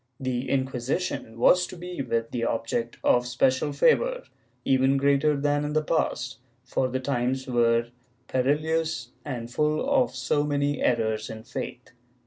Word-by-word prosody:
The 130 0 -2
Inquisition 130 -1 -2
was 180 +9 +4
to - - -10
be 175 -3 -5
the 115 -1 -2
object 115 +1 -2
of 125 0 +3
special 130 +3 +1
favor, - - +2 0.4
even 135 +1 +3
greater 140 +1 +2
than 145 +1 +1
in 150 0 -3
the 155 0 +2
past, 130 -6 -1 0.2
for 130 +1 0
the 130 +1 -2
times 130 0 -1
were 120 -2 +2 0.4
perilous 155 +5 0
and 120 -4 -5
full 150 +1 +1
of 125 0 +2
so 130 +3 +1
many 145 -1 0
errors 110 -3 0
in 110 0 -7
the - - -21
faith. 125 0 -6
130 Hz, 145 wpm, -26 LUFS, 120-145 Hz, 0.4 s, was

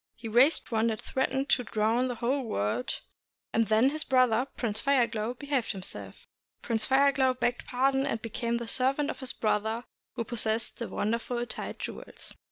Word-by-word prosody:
He 230 - -8
raised 250 +8 +4
one 225 0 +2
that 220 -2 -1
threatened 265 +1 -1
to 250 - +3
drown 225 +3 +1
the 245 - -3
whole 250 +5 0
world, 105 - -2 0.5
and 225 -1 +3
then 220 +5 +4
his 310 +1 -1
brother 255 -1 +3
Prince 215 -3 0
Fire 275 -3 +4
Glow 230 +2 -3
behaved 275 -4 -1
himself. 190 -1 -5 0.4
Prince 225 -2 0
Fire 275 +1 +5
Glow 260 -2 +2
begged 245 -1 -1
pardon 270 +2 +2
and 225 - -1
became 235 +1 -2
the 235 -1 -5
servant 270 +5 +1
of - - -10
his 260 -2 -3
brother 220 +2 0 0.3
who 235 - -1
possessed 225 0 -2
the 235 - -3
wonderful 235 +3 -1
tide - - -6
jewels. - - -8
240 Hz, 175 wpm, -29 LUFS, 225-265 Hz, 0.5 s, Fire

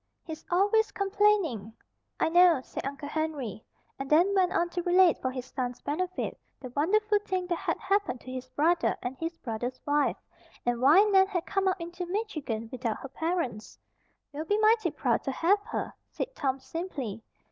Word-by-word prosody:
He's 320 -2 -8
always 410 +4 +3
complaining." 390 - +1 0.5
"I - - +2
know," 350 -3 +6
said - - -5
Uncle 280 +1 -6
Henry, 290 -9 -3 0.4
and 270 0 -5
then 345 +6 +4
went 370 -2 +3
on 345 - +1
to 350 0 -3
relate 360 -1 +4
for 260 - 0
his 255 -1 -5
son's 250 -2 -4
benefit 365 +5 -3 0.2
the 255 -3 -8
wonderful 420 +8 +2
thing 375 -3 -2
that 345 -2 -2
had - - -1
happened 390 -11 0
to 255 - -9
his 255 0 -6
brother 330 +6 +2
and 245 +2 -3
his 330 +1 -3
brother's 245 0 -4
wife, 290 0 +2 0.5
and 240 0 0
why 305 +10 +7
Nan 385 -2 +5
had 365 -3 -2
come 390 -1 0
up 375 0 +1
into 345 +1 -6
Michigan 310 - -3
without 240 -4 -2
her 270 - -9
parents. 320 - -3 0.6
"We'll 305 +2 -4
be 415 +5 +1
mighty 435 -3 +4
proud 270 -6 0
to 270 - 0
have 370 +9 +3
her," - - -4 0.2
said - - -4
Tom 270 - -1
simply. 265 - -5
330 Hz, 180 wpm, -28 LUFS, 260-380 Hz, 0.6 s, why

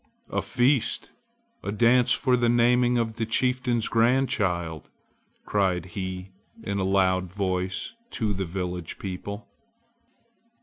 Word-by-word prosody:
"A - - 0
feast! 125 0 +1 0.5
a - - -3
dance 120 +3 +4
for 130 -1 +3
the 120 -1 +2
naming 120 +1 +4
of 115 -1 -1
the 115 - 0
chieftain's 125 0 +1
grandchild!" 105 - +1 0.6
cried 95 -4 +1
he 95 -1 -5 0.3
in 100 -2 -2
a - - 0
loud 95 -1 +2
voice 95 - -2 0.2
to 110 - -1
the 95 0 -2
village 90 -1 -4
people. 100 +3 -6
105 Hz, 120 wpm, -26 LUFS, 95-120 Hz, 0.6 s, dance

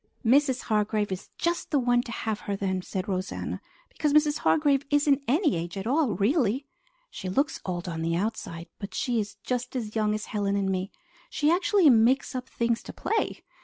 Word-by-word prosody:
"Mrs. 260 +2 +4
Hargrave 210 -1 0
is 190 0 -5
just 340 0 -1
the 295 - +2
one 245 -2 +3
to 240 - -8
have 220 -2 -2
her 200 - +1
then," 190 -1 -1
said 185 0 -4
Rosanna, 185 -1 -3 0.3
"because 300 -2 -1
Mrs. 300 0 +4
Hargrave 285 -3 +3
isn't 290 -1 +3
any 300 - +2
age 170 +3 -4
at 195 - -4
all, 265 - +2
really. 250 - +1 0.5
She 185 - -5
looks 275 +9 0
old 180 0 -3
on 165 -2 -3
the 165 0 0
outside, 170 -3 -3
but 200 0 -7
she 245 -3 0
is 205 -1 -4
just 250 +1 -3
as 220 -4 -4
young 215 -1 +1
as 215 - -4
Helen 200 -2 -1
and 195 -1 0
me. 185 +1 -2 0.4
She 300 +1 +2
actually 360 0 +4
makes 245 +5 +3
up 255 0 -5
things 235 -1 0
to - - -9
play! 445 - -2
230 Hz, 195 wpm, -27 LUFS, 195-280 Hz, 0.5 s, Mrs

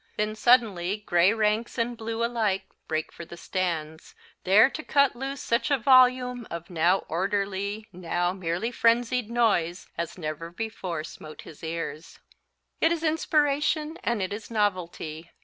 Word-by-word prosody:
Then 215 0 -1
suddenly 215 -6 +3
gray 175 +2 +4
ranks 220 +2 0
and 235 +1 -1
blue 230 0 -2
alike 220 -5 0 0.2
break 155 0 -2
for - - -9
the 170 +1 -11
stands, 165 -4 -3 0.3
there 200 +6 +7
to 310 - -6
cut 280 -3 +3
loose 270 +2 -5
such 235 +2 0
a 280 - +3
volume 250 -1 +4
of 170 +1 -7
now 175 +3 +2
orderly, 200 +4 -2
now 175 0 -1
merely 185 +4 -2
frenzied 235 0 +2
noise 200 -7 +1
as 170 +1 -4
never 155 0 -5
before 180 -4 -4
smote 155 -1 -10
his 155 - -13
ears. 160 -1 -5 0.6
It 325 - +3
is 335 -1 -1
inspiration 305 0 +1
and 235 -5 0
it 185 - -3
is 210 +1 -7
novelty. 175 -6 -2
205 Hz, 150 wpm, -26 LUFS, 170-240 Hz, 0.6 s, there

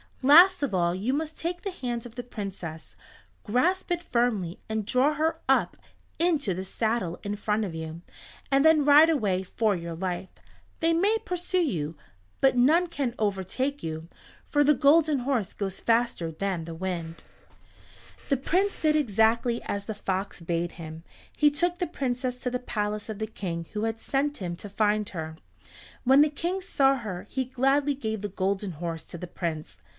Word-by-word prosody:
Last 345 +7 +8
of 275 - -1
all 175 -2 +2
you 215 +8 -1
must 315 +2 -3
take 350 +1 -3
the 395 - -3
hand 245 -8 -4
of 230 - -15
the 245 - -5
Princess. 195 -8 -7 0.5
Grasp 345 - +1
it 345 0 0
firmly, 225 - 0
and 220 -1 -2
draw 260 +7 +3
her 320 +2 0
up - - +3 0.4
into 315 - +2
the 190 +1 -4
saddle 215 -4 -1
in 205 0 -2
front 210 +1 0
of 180 - -5
you, 160 +1 -6 0.5
and 275 0 +4
then 315 -2 +5
ride 295 +3 +8
away 205 - +1
for 210 +2 0
your 170 -1 -5
life. 180 +1 -3 0.5
They 330 0 +3
may 400 +7 +3
pursue 360 +1 0
you, 165 - -2 0.4
but 270 -1 +4
none 310 +9 +5
can 275 -7 -2
overtake 215 +8 -1
you, 160 +1 -5 0.4
for 290 -1 +4
the 295 +1 +5
Golden 295 +2 +4
Horse 245 -6 -1
goes 195 -2 -4
faster 230 -8 +1
than 175 0 -3
the 165 0 -7
wind." 170 -2 -4 1.1
The 275 - +3
Prince 370 +9 +1
did 310 -1 +2
exactly 235 -2 +2
as 200 0 -3
the 220 - -4
fox 195 -1 -3
bade 170 +1 -2
him. 160 -1 -9 0.3
He 300 - +5
took 345 +4 0
the 355 - 0
Princess 255 -4 -2
to 250 - -3
the 250 - -1
palace 210 -3 -3
of 215 - -4
the 220 - -2
King 170 -6 -5
who 210 0 -2
had 225 0 -1
sent 285 +4 -1
him 175 -3 -4
to 205 - -8
find 210 0 +1
her. 160 -2 -6 0.7
When 270 +3 +6
the 300 - +5
King 345 +6 -2
saw 275 -6 +3
her 205 -7 -6
he 260 0 -1
gladly 270 +3 +2
gave 220 -6 -3
the 205 - -3
Golden 195 0 -1
Horse 165 0 -5
to - - -8
the 180 - -7
Prince. 165 -3 -4
225 Hz, 180 wpm, -27 LUFS, 185-285 Hz, 1.1 s, Last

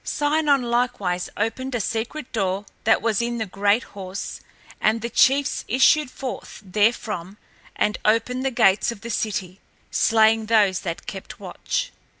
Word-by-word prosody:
Sinon 290 -2 +1
likewise 235 -7 -1
opened 245 +5 -2
a - - 0
secret 235 +7 -3
door 195 -2 -1 0.2
that 225 - +3
was 225 -1 +1
in 235 0 -2
the 220 - -2
great 205 +4 +1
horse 190 -1 -7 0.4
and 220 +1 +2
the 235 - -3
chiefs 275 +1 +3
issued 265 +4 +4
forth 260 0 -7
therefrom 205 -2 0 0.4
and 210 - 0
opened 250 +4 +1
the 270 - +1
gates 205 -4 +3
of 200 - -10
the 235 - -6
city, 195 -4 -3 0.3
slaying 220 0 +3
those 205 -4 +3
that 175 -1 -5
kept 195 -1 -8
watch. - - -3
225 Hz, 150 wpm, -23 LUFS, 200-250 Hz, 0.4 s, issued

